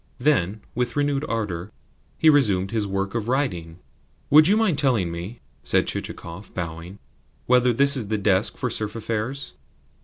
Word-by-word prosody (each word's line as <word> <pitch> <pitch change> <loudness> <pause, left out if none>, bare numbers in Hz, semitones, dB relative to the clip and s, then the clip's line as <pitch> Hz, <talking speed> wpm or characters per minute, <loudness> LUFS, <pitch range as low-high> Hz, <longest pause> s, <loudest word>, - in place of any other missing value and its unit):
Then, 110 - +1
with 125 0 -2
renewed 145 -1 0
ardour, 105 -4 -3 0.5
he 160 - +2
resumed 100 -11 +4
his 110 -3 -1
work 95 0 -2
of 115 -2 -3
writing. 90 - -2 0.5
"Would 155 +2 +8
you 205 +3 +4
mind 200 -10 +2
telling 120 - +1
me," 90 +8 -7 0.2
said - - +2
Chichikov, 85 +5 -6
bowing, 85 +2 -6 0.5
"whether 125 0 +4
this 140 +4 +4
is 120 -6 -2
the 110 +1 -1
desk 100 0 +1
for 125 - -2
serf 105 0 -2
affairs?" 115 +4 -4
110 Hz, 155 wpm, -23 LUFS, 95-135 Hz, 0.5 s, Would